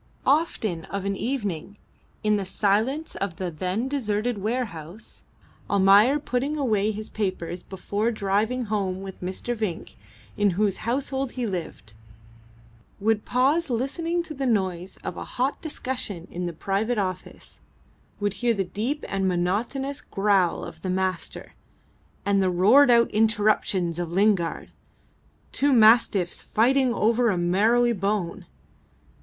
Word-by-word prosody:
Often 225 - +1
of 200 -1 -5
an 200 0 -1
evening, 205 - -3 0.5
in 210 0 +3
the 200 - -1
silence 215 +10 0
of 195 -4 -3
the 180 0 -4
then 185 +9 -2
deserted 235 -4 -1
warehouse, 210 -4 -5 0.5
Almayer 200 +7 +5
putting 275 +1 -2
away 215 -7 +1
his 215 0 -4
papers 185 -4 -3
before 205 +3 -2
driving 220 +3 0
home 195 -3 -2
with 195 -1 -9
Mr. 190 +6 -3
Vinck, 215 -7 -4 0.4
in 205 -1 +2
whose 205 -2 +2
household 265 0 -1
he 250 -2 -2
lived, 170 - -5 1.1
would 215 +1 +1
pause 280 +6 +2
listening 330 +8 -1
to 325 - -7
the 270 -2 -2
noise 190 -5 -1
of - - -5
a - - -4
hot 260 +3 -2
discussion 245 - -4
in 175 0 -3
the - - -3
private 200 +8 -1
office, 185 -2 -5 0.6
would 205 -2 0
hear 235 +1 0
the 195 - 0
deep 230 +11 -3
and 195 -1 -1
monotonous 215 +10 -1
growl 195 -3 +1
of 160 - -10
the 185 - -3
Master, 185 -1 -3 0.7
and 200 -1 +3
the 190 - +2
roared 215 +11 +5
out 235 -1 +5
interruptions 210 -5 +1
of 170 -1 -3
Lingard 190 -3 +1 0.8
two 285 +1 +2
mastiffs 220 -6 +4
fighting 255 +3 +2
over 235 +1 +2
a 190 - 0
marrowy 220 +8 +3
bone. 195 -3 -2
210 Hz, 135 wpm, -25 LUFS, 190-245 Hz, 1.1 s, Almayer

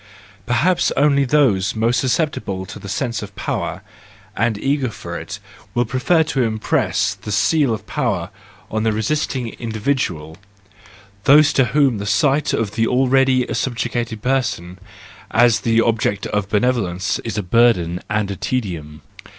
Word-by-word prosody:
Perhaps 155 +10 +2
only 140 -1 +3
those 120 -10 +2
most 115 +2 +1
susceptible 125 - -1
to - - -9
the 100 - -9
sense 115 +1 -2
of 105 -1 -9
power, - - -3 0.5
and 115 0 0
eager 135 +2 0
for 100 - -8
it, - - -6 0.4
will 120 0 +2
prefer 130 +9 +2
to 150 -4 -1
impress 110 -2 0
the 105 - -8
seal 130 +7 +2
of 110 - -4
power - - -2 0.4
on 110 - -1
the 110 0 +1
resisting 125 +2 -1
individual,—those 100 - -1
to 130 - +3
whom 130 -2 +2
the 100 - -4
sight 145 +6 +2
of 110 -3 -1
the 115 +1 0
already 130 0 +3
subjugated 120 -3 -2
person 115 -9 -1 0.5
as 120 -1 +4
the 115 -1 +2
object 110 -3 0
of 105 -1 -2
benevolence 105 -4 0
is 110 -2 -5
a 105 - -1
burden 90 -4 +2
and 105 -2 -1
a - - -4
tedium. 85 -10 -4
115 Hz, 140 wpm, -19 LUFS, 100-130 Hz, 0.5 s, as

